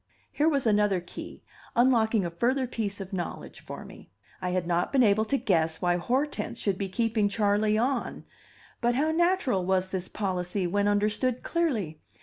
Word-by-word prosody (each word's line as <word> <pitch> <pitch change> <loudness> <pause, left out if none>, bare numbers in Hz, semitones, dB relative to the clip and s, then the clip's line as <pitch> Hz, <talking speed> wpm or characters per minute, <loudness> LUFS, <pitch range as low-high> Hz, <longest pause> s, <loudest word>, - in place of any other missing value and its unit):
Here 300 +2 +2
was 280 -5 0
another 205 -3 +3
key, 175 - -9 0.3
unlocking 230 -4 +3
a 170 - -3
further 255 +9 +1
piece 210 -5 -3
of 195 0 -7
knowledge 175 -2 -5
for - - -8
me. - - -13 0.3
I 180 - -1
had 180 -1 -1
not 175 0 0
been 270 -2 +4
able 215 0 +3
to 275 +5 +1
guess 165 -8 +1
why 175 0 +1
Hortense 250 +4 -1
should 195 -3 -1
be 195 -1 -2
keeping 220 +1 +1
Charley 210 0 +2
"on"; 245 +2 -1 0.6
but 240 0 +2
how 305 +4 +2
natural 340 - +2
was 190 0 +1
this 185 -1 -3
policy, 185 -1 -2
when 205 +3 +1
understood 210 +5 +1
clearly! 225 - -1
210 Hz, 170 wpm, -27 LUFS, 185-245 Hz, 0.6 s, been